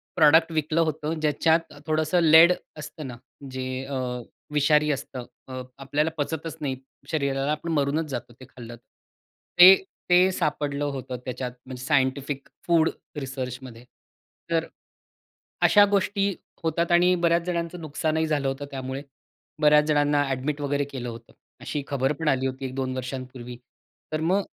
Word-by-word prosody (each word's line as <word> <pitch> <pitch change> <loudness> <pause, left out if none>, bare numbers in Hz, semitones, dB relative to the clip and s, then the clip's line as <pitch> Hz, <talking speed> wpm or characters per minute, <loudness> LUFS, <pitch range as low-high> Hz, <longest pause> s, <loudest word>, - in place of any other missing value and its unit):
Product 160 +1 +5
विकलं 155 +1 +1
होतं, 155 0 -1
ज्याच्यात 160 +2 +1
थोडंसं 155 +3 +1
लेड 160 +2 +8 0.3
असतं 150 -1 -8
ना, 125 - -7 0.4
जे 130 0 -4 0.2
अ, 140 - -5 0.6
विषारी 150 +1 +3
असतं. 135 -3 -5 0.2
अ, 130 -1 -6 0.2
आपल्याला 145 +3 0
पचतच 160 +1 -3
नाही 135 -3 -1 0.4
शरीराला. 140 -2 0
आपण 160 +2 -3
मरूनच 150 +1 +1
जातो 120 -2 -5
ते 130 - -11
खाल्लं 120 -2 -10
तर. 120 - -22 0.8
ते 185 +2 +11 0.3
ते 180 +1 +5
सापडलं 145 -4 -1
होतं 130 -3 -4
त्याच्यात 125 -1 -4
म्हणजे 130 -1 -8
सायंटिफिक 140 0 0 0.2
फूड 165 -2 +4 0.3
रिसर्चमध्ये 130 -2 -6 0.7
तर 165 0 +2 1.0
अशा 205 -1 +7
गोष्टी 200 0 +1 0.3
होतात 170 +1 0
आणि 175 +1 +5
बऱ्याच 170 0 +3
जणांचं 170 0 -3
नुकसानही 160 +1 -1
झालं 145 -3 0
होतं 135 +1 -3
त्यामुळे. 130 0 -5 0.6
बऱ्याच 150 0 +6
जणांना 145 -1 +2
अ‍ॅडमिट 140 +3 -2
वगैरे 145 0 0
केलं 125 -3 -5
होतं. 115 0 -11 0.3
अशी 145 -2 -3
खबर 135 +1 0
पण 160 - -3
आली 135 -2 +2
होती 130 +1 -5
एक-दोन 130 0 -3
वर्षांपूर्वी. 125 -1 -6 0.6
तर 155 - 0
मग 185 +5 +2
145 Hz, 140 wpm, -25 LUFS, 130-160 Hz, 1.0 s, ते